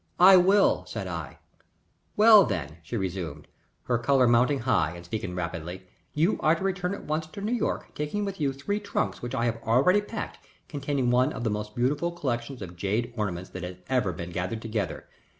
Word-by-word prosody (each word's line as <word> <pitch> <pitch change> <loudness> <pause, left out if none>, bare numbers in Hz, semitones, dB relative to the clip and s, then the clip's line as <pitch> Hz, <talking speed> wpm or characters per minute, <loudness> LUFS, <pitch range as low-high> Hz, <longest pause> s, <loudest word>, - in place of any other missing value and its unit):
"I 190 +2 +9
will," 195 +3 +4
said - - -5
I. - - -6 0.8
"Well, 215 -1 +9
then," 85 - -3
she 115 +9 -5
resumed, 90 -6 -4 0.4
her 120 -2 0
color 130 0 +3
mounting 125 +4 +3
high, 90 -9 +1
and 85 0 -10
speaking 95 -1 -4
rapidly, 90 +1 -5 0.3
"you 165 +7 +2
are 155 +2 +4
to 170 - -6
return 190 0 -1
at - - -10
once 155 +1 -2
to 160 - -10
New 210 +3 -2
York, 240 - -2
taking 150 +8 -2
with 195 -4 -5
you 140 -2 +2
three 140 +10 -3
trunks 105 - -2
which 120 +2 -4
I 120 - 0
have 115 -1 -1
already 135 - +4
packed, 210 +1 -6 0.3
containing 140 -4 -1
one 125 +4 +3
of 115 - -5
the 110 - 0
most 105 0 -4
beautiful 145 +8 0
collections 125 - -3
of 85 -1 -9
jade 110 +6 -1
ornaments 95 -5 -3
that - - -7
has 90 +1 -6
ever 125 -8 +1
been 85 0 -7
gathered 95 +6 -3
together. 110 -6 -3
120 Hz, 195 wpm, -27 LUFS, 95-160 Hz, 0.8 s, I